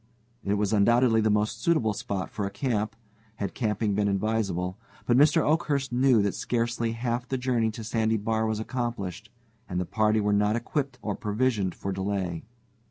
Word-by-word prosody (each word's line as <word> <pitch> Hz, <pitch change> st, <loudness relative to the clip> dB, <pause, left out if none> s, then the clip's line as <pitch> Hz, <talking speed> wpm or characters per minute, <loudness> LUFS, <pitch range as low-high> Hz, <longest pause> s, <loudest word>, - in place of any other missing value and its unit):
It 100 Hz, -, +1 dB
was, 105 Hz, 0 st, 0 dB
undoubtedly, 115 Hz, +2 st, +4 dB
the 110 Hz, -, +2 dB
most 105 Hz, 0 st, 0 dB
suitable 125 Hz, -11 st, +2 dB
spot 100 Hz, -2 st, -4 dB
for 100 Hz, -2 st, -2 dB
a -, -, -3 dB
camp, 110 Hz, 0 st, -2 dB, 0.4 s
had 100 Hz, -3 st, -4 dB
camping 105 Hz, -2 st, 0 dB
been 100 Hz, +1 st, +1 dB
advisable. 100 Hz, -2 st, -1 dB, 0.3 s
But 120 Hz, -, +3 dB
Mr. 150 Hz, +4 st, +5 dB
Oakhurst 145 Hz, -4 st, +1 dB
knew 125 Hz, -4 st, +4 dB
that 100 Hz, -, 0 dB
scarcely 115 Hz, -1 st, -1 dB
half 120 Hz, +1 st, -2 dB
the 130 Hz, -, -1 dB
journey 125 Hz, -3 st, +1 dB
to 110 Hz, +1 st, -7 dB
Sandy 110 Hz, 0 st, +1 dB
Bar 110 Hz, +1 st, 0 dB
was 110 Hz, -1 st, -1 dB
accomplished, 110 Hz, -5 st, -4 dB, 0.4 s
and 90 Hz, -1 st, -1 dB
the 90 Hz, -, -1 dB
party 110 Hz, +2 st, +2 dB
were 105 Hz, 0 st, +1 dB
not 105 Hz, +1 st, +2 dB
equipped 135 Hz, +2 st, -2 dB
or 105 Hz, -, -1 dB
provisioned 105 Hz, -3 st, 0 dB
for 100 Hz, -, -4 dB
delay. 95 Hz, -3 st, -2 dB
110 Hz, 175 wpm, -27 LUFS, 100-120 Hz, 0.4 s, Mr